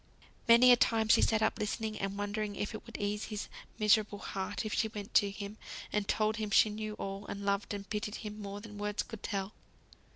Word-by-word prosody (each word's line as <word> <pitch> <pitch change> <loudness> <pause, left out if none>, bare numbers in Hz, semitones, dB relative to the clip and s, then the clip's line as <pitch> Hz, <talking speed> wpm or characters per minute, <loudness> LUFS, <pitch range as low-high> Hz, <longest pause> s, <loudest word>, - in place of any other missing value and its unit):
Many 235 +2 +8
a - - +10
time 225 -2 +2
she - - +7
sat 220 -1 +3
up 220 - +1
listening, 215 +1 -2
and 195 0 -3
wondering 205 0 -2
if 205 +3 -3
it 220 - -8
would 230 - -7
ease 205 +1 -2
his 210 -1 -5 0.3
miserable 210 -1 +3
heart 195 +2 -4
if 215 - -3
she 220 - +2
went 210 -2 -8
to 205 - +5
him, 200 +1 -7 0.4
and 210 -1 0
told 215 +1 +1
him 215 -2 -2
she 210 +1 +5
knew 215 0 -4
all, 195 0 -5
and 200 0 -5
loved 200 0 0
and 200 -1 -5
pitied 210 0 -3
him 210 -1 -7
more 200 0 -5
than 210 -1 -10
words 205 0 -1
could 225 -3 -9
tell. 200 0 -3
210 Hz, 220 wpm, -32 LUFS, 205-220 Hz, 0.4 s, a